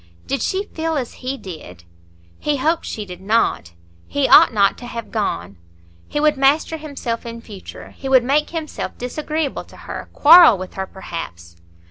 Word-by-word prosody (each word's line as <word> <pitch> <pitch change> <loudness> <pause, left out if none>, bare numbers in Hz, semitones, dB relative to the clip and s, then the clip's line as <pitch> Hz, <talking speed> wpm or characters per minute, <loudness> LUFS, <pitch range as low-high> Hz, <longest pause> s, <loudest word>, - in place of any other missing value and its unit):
Did 275 - -2
she 385 +1 -1
feel 325 -3 -3
as 250 -4 -4
he 265 +2 -3
did? 155 - -10 0.6
He 295 -1 0
hoped 320 +5 0
she 210 - -5
did—not. 190 - -1 0.3
He 285 -2 0
ought - - +8
not 200 -3 +3
to 245 - -9
have 230 -2 -7
gone. 100 - -3 0.5
He - - -2
would 300 -1 +3
master 285 +4 +2
himself 280 -6 -5
in 235 -1 -7
future. 210 -4 -11
He 270 - -7
would 260 -2 +5
make 285 +4 +1
himself 320 -2 -5
disagreeable 305 +3 -3
to - - -16
her, - - -8
quarrel 320 - +8
with 185 0 -8
her 190 0 -4
perhaps. 85 - -8
250 Hz, 165 wpm, -20 LUFS, 195-300 Hz, 0.6 s, ought